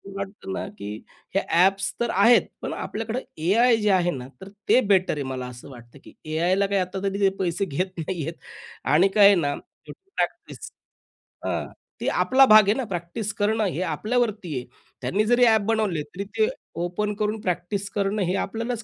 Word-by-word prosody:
वाटतं 195 0 -6
ना, - - -4
की 100 - -7 0.5
हे 195 - +5
ॲप्स 190 +3 +3
तर 235 - 0
आहेत 230 +5 +6 0.2
पण - - -4
आपल्याकडे 225 +3 -4 0.2
एआय 230 +6 +4
जे 210 -1 0
आहे 175 -2 +3
ना 125 0 -8
तर 190 - -9 0.2
ते 255 - +6
बेटर 185 -2 +3
आहे 145 - -3
मला 130 -1 -4
असं 125 +2 -11
वाटतं, 120 +1 -14
की - - -15 0.2
एआयला 185 +5 +2
काही 200 -1 +1
आता 185 +1 -4
तरी 195 0 +2
पैसे 185 +2 0
घेत 185 +4 -3
नाहीयेत. 165 -1 -3 0.5
आणि 170 +6 +4
काय 205 - +7
आहे 200 0 +8
ना 145 -5 0
शेवटी 390 0 -15
प्रॅक्टिस - - -4 0.7
हां - - -1 0.4
ते - - -2
आपला 265 +1 +6
भाग 215 -2 +8
आहे 205 - +4
ना 260 +3 -2
प्रॅक्टिस 175 +5 -4
करणं 215 +1 +1
हे 180 -1 -2
आपल्यावरती 210 - -1
आहे. 125 - -5 0.4
त्यांनी 210 +3 0
जरी 245 +2 +4
ॲप 220 -2 +5
बनवले 215 -9 0
तरी 180 +7 -7
ते 440 - +4 0.4
ओपन 205 +4 -2
करून 215 +1 -1
प्रॅक्टिस 195 +1 -2
करणं 200 +1 -1
हे 180 +1 0
आपल्यालाच 230 +2 -4
195 Hz, 180 wpm, -24 LUFS, 175-215 Hz, 0.7 s, आहे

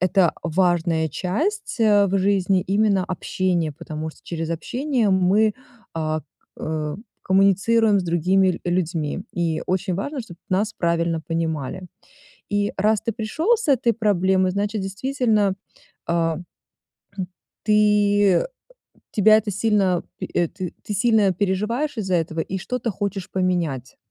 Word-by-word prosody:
это 185 -2 +3
важная 170 -2 +1
часть, 275 - -2
а, 205 -2 +5
в 195 +1 +1
жизни 195 -1 +2
именно 200 0 +2
общение, 180 -3 -1
потому 155 +2 -6
что - - -21
через 165 -1 -4
общение 245 - 0
мы, 195 +3 +3 0.4
а, 155 -1 -1 0.4
э, 155 -1 -3 0.3
коммуницируем 200 +3 +3
с - - -3
другими 180 +3 +2 0.2
ль 175 - -1
людьми. 170 -2 -1
И 165 -2 -1
очень 185 0 -1
важно, 270 - -3
чтоб 180 -7 -12
нас 205 +4 0
правильно 170 -3 0
понимали. 165 +1 -3 0.6
И 205 0 0
раз 210 +2 +2
ты 230 - -2
пришел 285 - +1
с 460 - -6
этой 245 -4 +3
проблемой, 190 -4 +2
значит 205 +2 -1
действительно, 210 0 0 0.5
а, 165 -1 +1
хм, 175 - -9 1.2
ты 215 - +2 0.7
э - - -6 0.7
тебя 215 0 +6
это 215 -1 -3
сильно 195 -3 +2 0.2
пе - - -4
э, 175 -1 +2
ты 185 +4 -7
сильно 210 -1 +3
переживаешь 210 - -1
из-за 190 -4 -1
этого 165 -1 -2
и 190 +4 -3
что-то 240 +5 -3
хочешь 195 -1 -4
поменять. 170 -9 -1
190 Hz, 135 wpm, -22 LUFS, 170-215 Hz, 1.2 s, тебя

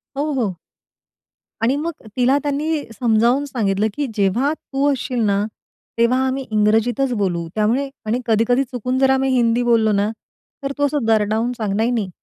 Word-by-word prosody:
हो, 295 +2 -1
हो. 215 -9 -1 1.0
आणि 245 +4 +2
मग 315 +4 -2 0.3
तिला 255 +3 +4
त्यांनी 295 +1 -1 0.2
समजावून 240 +4 +3
सांगितलं, 215 -5 0
की 290 +3 -2
"जेव्हा 230 +8 +1
तू 285 -2 -1
असशील 255 -2 -3
ना, 200 0 +2 0.5
तेव्हा 235 +2 +3
आम्ही 265 0 -2
इंग्रजीतच 225 +5 +2
बोलू." 170 -3 -1
त्यामुळे 235 +6 +1 0.2
आणि 225 +3 0
कधी-कधी 230 +3 +2
चुकून 250 0 -3
जर 265 0 +4
आम्ही 265 0 +2
हिंदी 235 0 +2
बोललो 230 -2 +3
ना, 205 +1 +1 0.5
तर 275 - -2
तू 285 - +2
असं 285 -3 -1
दरडावून 220 +2 +2
सांग, 210 -3 -2
"नाही, 225 +3 +1
नाही 215 -6 -1
240 Hz, 160 wpm, -20 LUFS, 215-270 Hz, 1.0 s, तिला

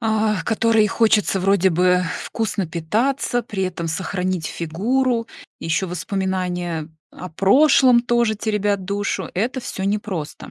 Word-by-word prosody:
а 220 -2 0
которые 225 -1 +2
и - - +3
хочется 210 -3 +2
вроде 195 0 +3
бы 180 +1 +3 0.2
вкусно 210 -4 -2
питаться, 230 - -1
при 195 -4 -3
этом 170 -2 -4
сохранить 180 0 -2
фигуру, 230 +9 -1 0.3
ещё 165 +3 -1
воспоминания 180 -3 -3 0.2
о 180 - -9
прошлом 250 - +5
тоже 235 -2 +1
теребят 205 -2 -1
душу. 200 +1 -2
Это 240 +8 -1
всё 190 -5 -5
непросто. 200 -6 -4
200 Hz, 125 wpm, -21 LUFS, 180-225 Hz, 0.3 s, прошлом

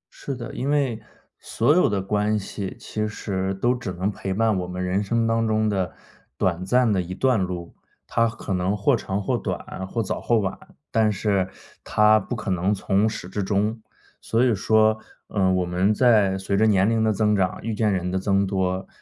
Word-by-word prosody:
是 140 - -5
的， 120 -1 -7
因 130 +3 -3
为 135 -6 0 0.4
所 120 +6 +1
有 180 - +4
的 100 -2 0
关 105 +2 0
系 100 -1 -5
其 105 0 -3
实 95 -3 -3
都 120 +6 +1
只 120 -6 -5
能 95 +4 -1
陪 95 -1 -5
伴 110 +2 +2
我 90 - -4
们 90 +1 -4
人 95 +3 0
生 115 +3 0
当 115 0 +1
中 110 0 +1
的 95 -4 -1 0.5
短 90 -1 0
暂 120 +3 +3
的 95 - +1
一 90 +1 -6
段 125 -2 +2
路。 90 -2 -5 0.3
它 115 0 +1
可 110 -3 -5
能 90 +3 0
或 120 +6 +3
长 95 -3 -3
或 - - 0
短、 95 - -5
或 115 +4 -2
早 - - -3
或 120 - +2
晚， 100 -3 -1 0.4
但 110 -1 +3
是 100 -2 0 0.3
它 105 0 +4
不 115 +4 -5
可 110 -4 -4
能 90 +2 +1
从 100 +2 +1
始 110 - -6
至 100 +3 -3
终。 105 +3 0 0.4
所 115 +3 +1
以 120 - +3
说， 110 +2 +3 0.3
呃， 95 -3 +2
我 90 -1 +1
们 90 +3 +1
在 105 -4 +4
随 95 +1 -2
着 110 +3 +4
年 100 -2 +4
龄 115 0 +2
的 110 - +3
增 105 0 +2
长、 95 -2 0
遇 115 +1 -2
见 105 0 +1
人 90 -2 -1
的 95 - 0
增 100 +1 +1
多， 95 -1 -1
105 Hz, 220 characters per minute, -24 LUFS, 95-110 Hz, 0.5 s, 有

